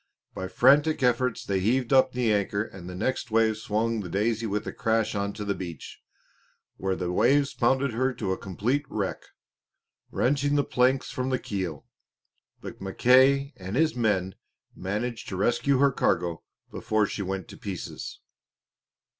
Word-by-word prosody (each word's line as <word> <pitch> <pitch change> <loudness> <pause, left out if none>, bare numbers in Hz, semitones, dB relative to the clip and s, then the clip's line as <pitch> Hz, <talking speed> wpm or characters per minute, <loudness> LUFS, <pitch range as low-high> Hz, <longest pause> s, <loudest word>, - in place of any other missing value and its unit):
By 95 - -4
frantic 145 +7 +4
efforts 125 0 +1
they 95 -1 0
heaved 125 +6 +1
up 130 -1 +5
the 125 -3 +1
anchor 100 0 0
and 95 -5 -10
the 90 - -7
next 125 +5 -2
wave 110 -1 +2
swung 110 +1 -1
the 95 -4 -5
Daisy 110 +4 0
with 105 0 -2
a - - -5
crash 115 -1 0
onto 100 0 -3
the 100 - 0
beach, 85 -6 -8 0.8
where 95 -1 -1
the 90 -1 -3
waves 140 +9 +3
pounded 130 +1 +1
her 130 +3 +1
to 100 -4 -2
a 95 - -1
complete 115 +10 -1
wreck, 100 -3 -3 0.9
wrenching 145 +2 +1
the 145 - +3
planks 130 +1 +1
from 130 0 -2
the 130 - +1
keel. 95 - -4 0.8
But - - -9
Mackay 130 +8 +4
and 95 +3 -6
his 155 +2 +3
men 100 -6 0 0.4
managed 110 +5 -4
to 95 - -4
rescue 120 +7 +2
her 140 +1 +4
cargo 85 -8 0 0.3
before 110 -1 0
she 105 - -4
went 95 -1 -4
to - - -11
pieces. 95 -4 -7
110 Hz, 160 wpm, -27 LUFS, 95-130 Hz, 0.9 s, up